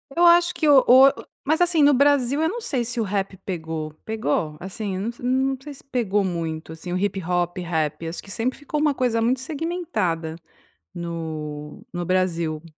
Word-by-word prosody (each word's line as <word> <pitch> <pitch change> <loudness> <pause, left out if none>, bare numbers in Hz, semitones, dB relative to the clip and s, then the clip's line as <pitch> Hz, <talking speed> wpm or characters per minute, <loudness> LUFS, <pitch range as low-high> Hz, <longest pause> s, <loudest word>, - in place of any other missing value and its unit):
Eu 345 +1 +4
acho 345 +1 +6
que 315 - 0
o 275 -3 +7
o 260 +2 +9 0.4
mas, 315 +3 +2
assim, 340 -3 +4
no 290 0 +6
Brasil 280 0 +3
eu 320 - +2
não 465 +7 -4
sei 270 - -1
se 240 +1 -3
o - - +2
rap 195 -1 -2
pegou, 160 -4 -4
pegou? 155 -8 -1
Assim 195 +1 -5
eu 210 +5 -2
não 265 +2 +1
sei 290 +1 -9
se - - -17
pegou 225 -7 0
muito, 165 -3 -3
assim, 160 +2 -8
o 180 - 0
hip 195 -1 -1
hop, 175 0 -1
rap 160 -2 -2
acho 165 - -5
que 195 - -11
sempre 235 +5 -2
ficou 295 +1 -3
uma 295 -2 +2
coisa 240 -3 +1
muito 245 +3 +2
segmentada, 260 - -2 0.6
no 155 -3 -6
no 175 -1 -3
Brasil, 170 -4 0
205 Hz, 190 wpm, -23 LUFS, 170-270 Hz, 0.6 s, o